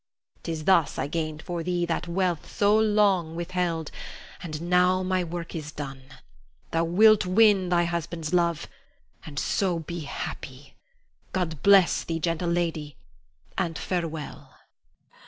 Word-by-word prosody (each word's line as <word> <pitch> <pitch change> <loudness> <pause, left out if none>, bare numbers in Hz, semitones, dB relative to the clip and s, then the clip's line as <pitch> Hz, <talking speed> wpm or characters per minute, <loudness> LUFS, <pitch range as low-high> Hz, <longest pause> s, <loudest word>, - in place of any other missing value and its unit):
'Tis 160 -2 -4
thus 170 -6 +3
I - - -1
gained 155 +1 -3
for 175 -1 -4
thee 175 +1 -1
that 170 +1 -2
wealth 175 -2 -1
so 205 +1 +3
long 205 -6 +2
withheld; 170 -2 -2 0.5
and 155 -3 -5
now 180 +2 +3
my 185 0 0
work 170 0 -6
is 150 -2 -5
done. 135 -2 -7 0.7
Thou 165 0 +1
wilt 210 +4 +5
win 195 -1 +4
thy 175 -1 +3
husband's 170 -1 -3
love, 170 -2 +1 0.6
and 145 -2 -10
so 180 +3 0
be 170 +2 -6
happy. 140 -2 -7 0.6
God 165 -6 -2
bless 195 -3 +5
thee, 165 -1 -3
gentle 170 +1 -1
lady, 165 -4 -2 0.6
and 170 -4 -1
farewell. 165 -4 -4
170 Hz, 135 wpm, -26 LUFS, 160-185 Hz, 0.7 s, wilt